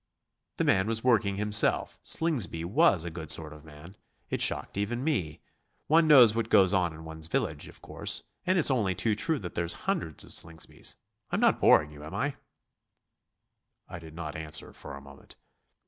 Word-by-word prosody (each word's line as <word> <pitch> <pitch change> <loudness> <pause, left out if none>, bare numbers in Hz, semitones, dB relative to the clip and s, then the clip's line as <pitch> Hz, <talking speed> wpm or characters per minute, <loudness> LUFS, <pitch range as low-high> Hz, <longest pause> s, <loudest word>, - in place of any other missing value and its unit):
'" - - -56
"The - - 0
man 95 +2 +2
was 110 0 -1
working 105 -6 +2
himself 105 0 +1
Slingsby 120 - 0
was 90 -1 +2
a 85 - -5
good 80 -1 -8
sort 75 -2 0
of 75 -1 -14
man. 80 +4 -14 0.4
It - - -2
shocked - - +2
even 110 +5 -3
me. 95 - -2 0.4
One 160 +1 +3
knows 125 -8 +7
what 115 0 -2
goes 95 0 +4
on 90 -3 +1
in 80 +1 -12
one's 80 0 -5
own - - -20
village, - - -2
of - - -16
course. - - -2 0.2
And 185 +1 +2
it's 155 -4 +4
only 105 -8 0
too 110 +3 0
true 155 +9 0
that 90 -9 -8
there's 85 0 -1
hundreds 80 -3 -2
of - - -13
Slingsbys 80 -2 -3 0.3
I'm - - -1
not - - +2
boring 75 - +4
you, 75 0 -12
am 80 +5 -8
I?" 140 +5 -2 1.5
I 85 - -9
did 80 -1 -13
not 80 -3 -6
answer 80 -1 -2
for - - -10
a 70 - -11
moment. 70 0 -16
90 Hz, 195 wpm, -28 LUFS, 80-115 Hz, 1.5 s, knows